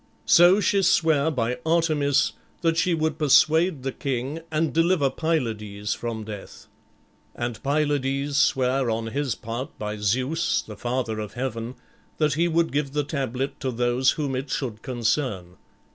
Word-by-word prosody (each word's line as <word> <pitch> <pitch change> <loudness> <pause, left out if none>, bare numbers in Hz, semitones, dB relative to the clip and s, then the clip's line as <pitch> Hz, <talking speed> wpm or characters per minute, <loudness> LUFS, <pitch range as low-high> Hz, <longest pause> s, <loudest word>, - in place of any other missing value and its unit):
So 175 +4 +6
she 200 -1 +2
sware 160 -5 +3
by 125 -4 -1
Artemis 155 -3 +2 0.3
that 165 -1 +2
she 170 +1 +2
would 160 0 -1
persuade 155 +1 +4
the 135 - -2
king, 135 +3 -3
and 155 0 0
deliver 165 -4 +2
Pylades 105 -10 -2
from 115 -2 -5
death. 105 -2 -9 0.7
And 120 -2 -4
Pylades 140 -1 0
sware 130 -2 +2
on 115 0 -1
his 140 -2 -1
part 115 +4 -6
by 105 0 -4
Zeus, 130 - 0
the 105 - -10
father 120 -1 -2
of 105 -2 -6
heaven, 120 -1 -4 0.4
that 155 -2 +2
he 170 +4 +2
would 170 0 +1
give 140 -1 -1
the 150 0 +1
tablet 135 -2 -3
to 135 - -2
those 120 +1 +2
whom 145 -4 -2
it 135 +2 -4
should 120 -6 -3
concern. 115 -7 -2
135 Hz, 150 wpm, -24 LUFS, 120-155 Hz, 0.7 s, So